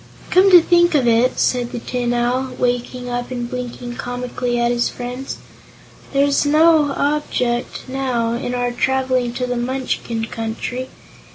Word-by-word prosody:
"Come 375 +2 +6
to 360 -2 +10
think 345 -1 +4
of 265 -4 +3
it," 235 +2 +3
said 245 -1 +1
the - - -5
Tin 245 0 -2
Owl, 250 +2 0
waking 245 0 -1
up 245 0 -3
and 245 -2 -4
blinking 245 0 -6
comically 245 0 -3
at 240 0 +2
his 240 0 +1
friends, 250 +2 -6 0.7
"there's 280 0 +2
no 305 0 +4
object, 260 -4 -1
now, 255 -3 -1
in 245 +1 -3
our 245 0 0
traveling 255 -1 0
to 250 +1 -2
the 245 0 -2
Munchkin 240 -2 -2
Country. 230 +3 -4
250 Hz, 150 wpm, -19 LUFS, 240-265 Hz, 0.7 s, to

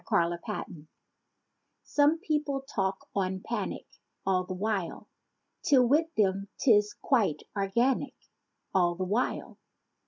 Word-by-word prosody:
ALL 170 0 +3
THE 170 - -4
WHILE 155 -2 -6 1.0
Some 295 +2 +3
people 300 -5 -1
talk 195 -8 -2
on 190 -1 -1
panic— 235 - -3 0.4
All 185 -1 +2
the 185 0 -5
while, 195 -2 -2 0.5
'Till 260 -4 +5
with 300 +6 +3
them 195 -1 +1
'tis 210 -5 +4
quite 210 - +2
organic. 235 +7 +1 0.6
All 175 -2 +3
the 185 - -2
while. 210 +7 -1
205 Hz, 120 wpm, -29 LUFS, 185-265 Hz, 1.0 s, Till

